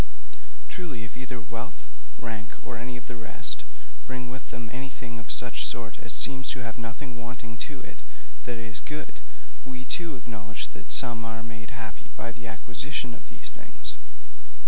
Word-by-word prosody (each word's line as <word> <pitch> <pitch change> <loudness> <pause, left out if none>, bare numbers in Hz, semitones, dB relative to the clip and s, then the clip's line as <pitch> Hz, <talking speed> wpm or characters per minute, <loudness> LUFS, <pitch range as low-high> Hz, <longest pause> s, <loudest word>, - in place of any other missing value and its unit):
Truly, 155 - 0
if 115 - -5
either 125 -1 -1
wealth, 115 0 -2 0.3
rank, 110 -1 -1
or 120 - -1
any 125 +2 0
of 125 - -6
the 125 - -2
rest, 115 -1 0 0.4
bring 125 -1 0
with 130 +1 -4
them 120 -1 -1
anything 125 -2 -1
of 115 - -6
such 120 -1 +3
sort 115 -2 +2
as 120 - -2
seems 130 +3 +8
to 130 - +3
have 115 -1 -1
nothing 120 +2 -1
wanting 120 -1 -2
to 140 -3 -3
it - - -7 0.5
that 120 -1 +2
is 115 0 -1
good, 150 0 -2 0.4
we, 130 -1 -3
too, 170 0 +3
acknowledge 110 -3 -1
that 65 - -5
some 120 -1 +5
are 115 0 0
made 115 -1 -3
happy 115 -2 -3
by 115 - +1
the 115 0 -4
acquisition 120 +3 +1
of - - -8
these - - -2
things. - - -4
120 Hz, 170 wpm, -34 LUFS, 115-125 Hz, 0.5 s, seems